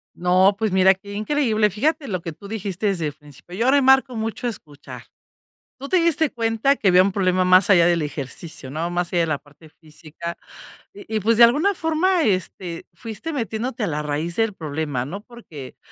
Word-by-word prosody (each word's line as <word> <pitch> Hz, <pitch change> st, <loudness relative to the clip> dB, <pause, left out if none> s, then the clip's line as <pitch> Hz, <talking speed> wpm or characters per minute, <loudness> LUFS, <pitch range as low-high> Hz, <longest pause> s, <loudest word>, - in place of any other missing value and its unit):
No, 185 Hz, +3 st, +3 dB
pues 220 Hz, -1 st, -1 dB
mira, 190 Hz, 0 st, +5 dB
qué 200 Hz, +2 st, -11 dB
increíble, 215 Hz, -1 st, +1 dB
fíjate 285 Hz, -, -1 dB
lo 185 Hz, -4 st, -3 dB
que 165 Hz, -1 st, -6 dB
tú 200 Hz, -, -13 dB
dijiste 205 Hz, -1 st, -3 dB
desde 175 Hz, -6 st, -1 dB
el 145 Hz, -, -5 dB
principio, 150 Hz, +3 st, -14 dB
yo 235 Hz, +6 st, +1 dB
remarco 265 Hz, -2 st, +4 dB
mucho, 225 Hz, +2 st, -3 dB
escuchar. 150 Hz, -10 st, -9 dB, 0.7 s
Tú 275 Hz, +1 st, -8 dB
te 375 Hz, -, +3 dB
diste 330 Hz, -3 st, +2 dB
cuenta 230 Hz, +4 st, +1 dB
que 200 Hz, -, -1 dB
había 180 Hz, 0 st, +6 dB
un 195 Hz, -, 0 dB
problema 185 Hz, -1 st, +1 dB
más 185 Hz, +1 st, +5 dB
allá 175 Hz, -4 st, +6 dB
del 175 Hz, -1 st, +2 dB
ejercicio, 145 Hz, 0 st, -6 dB
¿no? 160 Hz, +4 st, -3 dB
Más 175 Hz, 0 st, -2 dB
allá 175 Hz, -, +2 dB
de -, -, -1 dB
la 155 Hz, -3 st, -1 dB
parte 150 Hz, +2 st, -19 dB
física, 160 Hz, +2 st, -9 dB, 0.6 s
y 395 Hz, -, -8 dB
y -, -, +2 dB
pues 225 Hz, +3 st, +2 dB
de 240 Hz, -, +8 dB
alguna 305 Hz, +12 st, +2 dB
forma, 330 Hz, +2 st, +1 dB
este. 185 Hz, -4 st, -2 dB
fuiste, 225 Hz, -, -7 dB
metiéndote 235 Hz, -2 st, -3 dB
a 205 Hz, -, 0 dB
la 150 Hz, -1 st, -2 dB
raíz 150 Hz, +3 st, -3 dB
del 225 Hz, -2 st, 0 dB
problema, 150 Hz, -6 st, -4 dB
¿no? 195 Hz, +9 st, -7 dB
Porque 190 Hz, -, -12 dB
195 Hz, 195 wpm, -22 LUFS, 170-235 Hz, 0.7 s, de